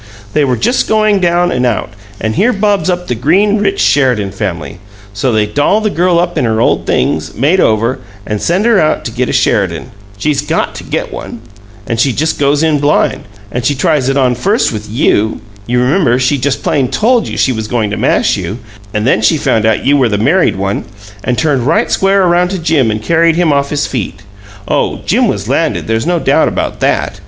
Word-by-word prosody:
They 150 - +2
were 130 -3 0
just 240 - 0
going 215 -2 +2
down 175 0 +1
and 125 - -1
out, 120 -2 -1 0.3
and 110 0 -2
here 220 - +2
bobs 205 -1 0
up 180 0 -1
the - - -1
green, 190 - +2
rich 200 -1 0
Sheridan 125 -8 +2
family! 90 -6 -5 0.3
So 120 +6 -1
they 110 -2 +2
doll 145 - +1
the 215 -1 -1
girl 175 0 +1
up 175 0 0
in - - 0
her 110 -1 0
old - - +1
things, - - -1
made 150 - +2
over, 115 +1 +1 0.3
and 105 -1 -3
send 185 +5 0
her 230 -4 +4
out 155 0 0
to 115 - -4
get 125 +2 -2
a - - -1
Sheridan 100 - 0 0.3
she's 145 +7 0
GOT - - -2
to - - -8
get - - -4
one! 115 - -8 0.4
And 115 +2 -3
she 130 +2 +2
just 155 +7 -1
goes 145 +2 +2
in 155 -2 +2
blind; 145 +1 +1 0.3
and 125 +2 -3
she 145 - +1
tries 135 0 +1
it 135 - 0
on 130 -2 +2
first 195 - 0
with 105 -1 -6
YOU. 110 -1 +1 0.3
You 125 +1 +1
remember, 125 -1 +2
she 130 +2 +1
just 140 +1 -1
plain 135 -3 +1
TOLD 235 +1 +1
you - - -5
she 130 - +2
was 110 -2 -4
going 110 -3 -1
to - - -2
mash - - +1
you, 95 +3 -5 0.4
and 105 0 0
then 125 - +2
she 110 +9 +3
found 110 -6 +1
out 110 - 0
you 145 +2 +4
were 130 -4 +2
the 105 - 0
married 150 - +2
one, 95 +1 -2 0.4
and 125 -1 -1
turned 140 -6 0
right - - +1
square 195 0 +2
around 175 0 +2
to 190 - -3
Jim 160 -8 +1
and 105 0 -3
carried 165 +3 +2
him 170 -3 +2
off 140 0 0
his 145 -1 -1
feet. 120 -7 -5 0.4
Oh, - - 0
Jim - - +2
was - - -3
landed - - 0
there's 115 +6 -1
no 175 0 +1
doubt - - +2
about - - -3
THAT! - - -1
135 Hz, 220 wpm, -12 LUFS, 110-175 Hz, 0.4 s, her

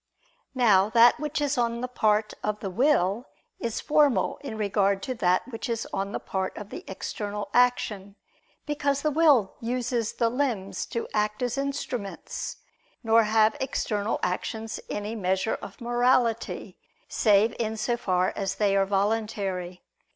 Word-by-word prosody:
Now 210 -6 +4
that 235 +4 +6
which 300 0 -2
is 290 -2 0
on 235 0 0
the 250 - -2
part 215 -3 +1
of 210 0 -1
the 195 - -4
will 235 -1 +2 0.3
is 230 -2 -2
formal 290 -10 +2
in 260 -7 -6
regard 200 -2 +1
to 260 - -2
that 185 -4 +1
which 225 -2 -5
is 230 -1 -2
on 195 +1 -2
the - - -3
part 190 -1 -3
of 210 0 -8
the - - -7
external 205 +2 -5
action: 215 -5 +1 0.5
because 285 -2 -1
the 305 - +2
will 290 -10 +4
uses 240 -1 -1
the 230 - +1
limbs 240 -7 -2
to 230 - -3
act 210 +2 0
as 245 -1 -1
instruments; 275 -7 -4 0.5
nor 225 0 +4
have 215 0 +3
external 215 -5 -1
actions 200 +5 -3
any 210 +1 -3
measure 190 0 -1
of - - -10
morality, 240 -1 0 0.3
save 215 +1 +3
in 220 -1 -2
so 235 +3 0
far 185 -6 0
as 195 -1 -2
they 200 -2 +2
are 195 0 +3
voluntary. 195 -3 -1
220 Hz, 150 wpm, -26 LUFS, 200-245 Hz, 0.5 s, that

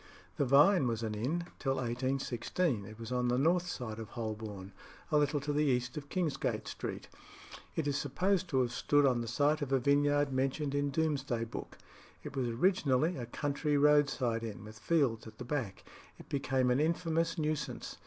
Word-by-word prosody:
The 140 - +2
Vine 140 +4 +5
was 115 -1 -2
an 110 -1 -2
inn 140 +11 -2
till 135 -2 0
1816. 130 - -1
It 110 +1 -10
was 115 +1 -7
on 125 -1 +1
the 120 0 +2
north 170 +6 +2
side 115 -9 -5
of 110 -1 -7
Holborn, 110 -5 -5 0.4
a 150 - +4
little 145 0 +1
to 145 +1 -2
the 150 +1 +2
east 125 -2 0
of 145 -1 -7
Kingsgate 165 -7 -1
Street. - - -5 0.7
It 160 - -1
is 140 -1 0
supposed 185 +7 0
to 130 -2 +2
have 120 -1 0
stood 145 +3 +3
on 125 -3 +2
the 115 - -4
site 145 +6 +2
of 140 -2 -3
a 135 - +4
vineyard 145 +1 +2
mentioned 135 +2 0
in 145 0 +1
Doomsday 140 -5 0
Book. 115 - -7 0.5
It 145 -2 -7
was 130 -2 0
originally 155 +2 +2
a 120 -5 -5
country 145 +3 -1
roadside 140 -5 +3
inn, 110 -3 -6
with 110 0 -11
fields 135 -9 +1
at 110 0 -12
the - - -7
back. 120 -8 -3 0.3
It - - -14
became 130 -2 +1
an 125 - +2
infamous 165 +1 0
nuisance. 155 -1 -3
135 Hz, 185 wpm, -32 LUFS, 120-150 Hz, 0.7 s, Vine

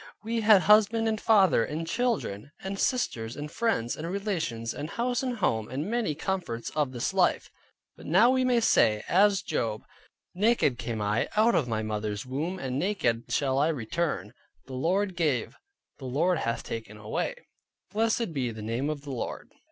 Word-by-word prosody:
We 230 +1 -1
had 210 -3 +6
husband 215 +2 +5
and 220 -1 -1
father, 190 - +4
and 155 +6 -4
children, 200 - -1
and 195 +1 -4
sisters, 120 - -1
and 150 +1 -6
friends, 220 - 0
and 165 +2 -5
relations, 170 - -2
and 150 +2 -5
house, 245 +3 -1
and 255 -2 -2
home, 110 - 0
and 135 +5 -3
many 230 -10 0
comforts 160 -9 -3
of 150 -4 0
this 120 -2 -2
life: - - +1 0.4
but - - -12
now 200 +10 +5
we 260 0 +2
may 250 -2 +3
say, 105 - +3
as 200 +2 +4
Job, 110 -2 -2 0.5
"Naked 200 - +2
came 115 -3 -3
I 105 +2 0
out 225 +2 +5
of 135 - +2
my 110 -2 -1
mother's 105 0 -3
womb, 150 +9 -3
and 135 -6 -3
naked 145 - 0
shall 135 -1 +1
I 145 - +3
return: 130 - -2 0.3
the 130 - -10
Lord 185 +8 0
gave, 150 -9 0 0.4
the 135 - -8
Lord 155 +7 +1
hath 115 - -2
taken 110 -2 -6
away, 110 - -3 0.6
blessed 220 -2 0
be 130 -4 -1
the 110 -2 -7
name 115 +6 -2
of 150 -2 -3
the 145 -1 -8
Lord." 125 - -5
155 Hz, 175 wpm, -28 LUFS, -, 0.6 s, had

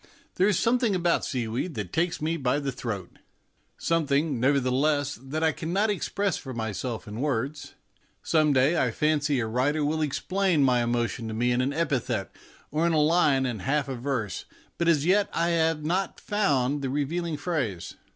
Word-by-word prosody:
There 190 - +2
is 205 -4 +2
something 235 -3 +2
about 175 -1 +1
seaweed 125 +6 -3
that 100 -5 -5
takes 165 -1 0
me 160 +2 0
by 135 -3 0
the 140 -2 -2
throat 115 -8 -6 0.6
something, 150 -4 +1
nevertheless, 140 +2 +2
that 150 +4 -3
I 160 - +4
cannot 190 +8 0
express 200 0 -1
for 130 -2 -7
myself 110 +1 -4
in 105 +4 -5
words. 140 +1 -2 0.5
Some 155 -2 +3
day 140 +5 +3
I 125 - +1
fancy 145 +2 +1
a 115 - 0
writer 135 +7 0
will 155 +2 0
explain 175 +2 +1
my 125 -2 +3
emo 120 0 +1
tion 115 0 -5
to 110 - -4
me 120 +2 +1
in 120 +1 +2
an 130 +2 0
epithet 130 -9 -1 0.4
or 155 +3 +1
in 170 - +1
a 155 - +3
line 150 -4 +3
and 120 -6 -3
a - - -10
half 140 +1 +1
of 130 -3 -5
verse; 125 -6 -2 0.3
but 170 - +1
as 155 -3 +3
yet 195 +3 +3
I 170 +1 +1
have 160 -2 +1
not 185 +4 -1
found 145 - +1
the 135 - -2
revealing 155 +4 -2
phrase. 140 - -3
145 Hz, 185 wpm, -27 LUFS, 125-165 Hz, 0.6 s, I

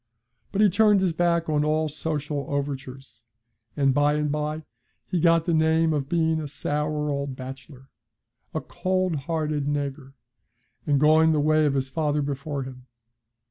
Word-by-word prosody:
But 200 - 0
he 210 - +6
turned 210 +1 +4
his 185 -3 +1
back 170 0 +1
on 150 -1 +1
all 155 +1 +1
social 150 -2 -3
overtures, 135 -4 -5 0.6
and 135 -2 +3
by 145 +1 +3
and 150 -1 0
by 150 +1 -2 0.4
he 180 - -1
got 165 -1 +3
the 170 - +1
name 160 0 +3
of 140 -2 -2
being 160 -2 +1
a 150 - -5
sour 150 +1 -2
old 140 -1 -3
bachelor, 130 +1 -10 0.6
'a - - -3
cold 185 -2 -1
hearted 150 0 -2
naygur,' 140 -2 -3 0.8
going 155 +2 +5
the 150 - +1
way 155 +1 +3
of 140 - 0
his 135 -1 0
father 150 0 -1
before 140 0 -3
him. 130 -1 -11
150 Hz, 155 wpm, -25 LUFS, 140-160 Hz, 0.8 s, he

